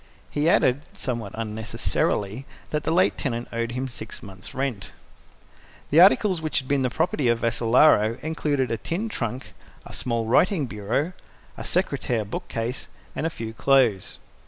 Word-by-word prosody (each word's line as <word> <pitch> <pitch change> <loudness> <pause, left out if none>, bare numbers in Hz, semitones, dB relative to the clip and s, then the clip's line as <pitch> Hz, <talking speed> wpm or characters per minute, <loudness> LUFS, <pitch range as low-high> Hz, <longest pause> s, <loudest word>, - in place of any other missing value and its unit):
He 150 +2 +2
added, 130 -4 +3
somewhat 120 - -4
unnecessarily, 110 +1 -2 0.2
that 150 0 -1
the - - +1
late 185 +3 +3
tenant 120 -4 -2
owed 115 0 -2
him 130 +2 -2
six 110 -3 -8
months' 95 -2 -10
rent. 130 -7 -3 1.0
The 155 - +6
articles 190 -2 +5
which 155 -1 -1
had 130 - -1
been 140 0 +2
the 130 - +1
property 150 -2 0
of 120 0 +3
Vassalaro 115 -1 +4
included 145 -4 0
a 115 - 0
tin 180 - -3
trunk, 125 - -4 0.3
a - - -10
small 115 -2 -1
writing 155 - +3
bureau, 120 - -2 0.4
a - - -7
secretaire 115 -4 0
bookcase 115 +4 -4 0.3
and 160 - -1
a - - -1
few 115 -8 -6
clothes. 120 -7 +2
125 Hz, 155 wpm, -25 LUFS, 115-150 Hz, 1.0 s, The